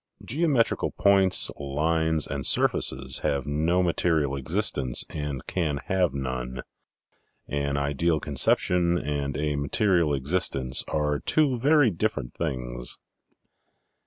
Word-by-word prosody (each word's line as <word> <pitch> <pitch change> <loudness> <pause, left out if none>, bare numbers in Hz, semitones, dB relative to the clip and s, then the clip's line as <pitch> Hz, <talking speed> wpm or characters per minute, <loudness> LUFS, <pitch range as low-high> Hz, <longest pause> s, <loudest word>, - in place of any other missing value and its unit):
Geometrical 140 -4 0
points, 95 -2 +5
lines, 80 +2 0
and 70 -2 -5
surfaces, 65 +1 +2
have 70 0 -2
no 80 +5 0
material 80 -5 0
existence 70 - 0
and 75 -4 -5
can 80 -6 -2
have 90 -4 +1
none. 65 -2 -5 0.8
An 70 -1 -2
ideal 70 +3 0
conception 85 +5 +1
and 70 -3 -3
a 75 -1 -1
material 85 +1 +1
existence 70 -3 0
are 75 -1 -1
two 140 -6 +1
very 145 -2 +3
different 85 - -3
things. 60 -6 -4
75 Hz, 105 wpm, -25 LUFS, 70-90 Hz, 0.8 s, points